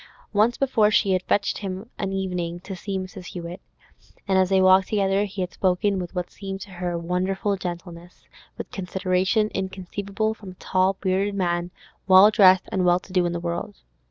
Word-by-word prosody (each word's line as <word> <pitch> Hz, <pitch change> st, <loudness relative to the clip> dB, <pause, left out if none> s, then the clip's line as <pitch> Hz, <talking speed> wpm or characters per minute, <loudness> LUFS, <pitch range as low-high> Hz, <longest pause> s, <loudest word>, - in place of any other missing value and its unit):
Once 215 Hz, +4 st, +3 dB
before 230 Hz, -6 st, +3 dB
she 200 Hz, -2 st, +2 dB
had 185 Hz, -1 st, +2 dB
fetched 200 Hz, +2 st, 0 dB
him 190 Hz, -2 st, -4 dB
of 225 Hz, -, -16 dB
an 195 Hz, -, -2 dB
evening 180 Hz, -3 st, -3 dB
to 190 Hz, +2 st, -8 dB
see 195 Hz, +2 st, -4 dB
Mrs. 185 Hz, 0 st, -7 dB
Hewett, 175 Hz, 0 st, -7 dB, 0.7 s
and 195 Hz, -, +2 dB
as 185 Hz, -1 st, +2 dB
they 190 Hz, -1 st, +3 dB
walked 185 Hz, 0 st, +5 dB
together 200 Hz, -1 st, +1 dB
he 195 Hz, -1 st, -6 dB
had 180 Hz, 0 st, -3 dB
spoken 190 Hz, +1 st, +1 dB
with 180 Hz, 0 st, -6 dB
what 180 Hz, -1 st, -3 dB
seemed 195 Hz, -1 st, -6 dB
to 195 Hz, -, -9 dB
her 175 Hz, -1 st, -3 dB
wonderful 185 Hz, +4 st, -1 dB
gentleness, 175 Hz, -1 st, -8 dB, 0.3 s
with -, -, -7 dB
consideration 190 Hz, +3 st, 0 dB
inconceivable 195 Hz, +3 st, -3 dB
from 200 Hz, -4 st, -11 dB
a -, -, -23 dB
tall, 185 Hz, +1 st, +1 dB
bearded 195 Hz, +1 st, 0 dB
man, 175 Hz, -2 st, -1 dB, 0.4 s
well 190 Hz, +2 st, +8 dB
dressed, 190 Hz, -4 st, +5 dB
and 190 Hz, -, 0 dB
well 175 Hz, 0 st, +4 dB
to 185 Hz, -, -15 dB
do 180 Hz, -2 st, +3 dB
in -, -, -2 dB
the 170 Hz, -, -3 dB
world. 170 Hz, 0 st, -4 dB
190 Hz, 190 wpm, -24 LUFS, 180-200 Hz, 0.7 s, well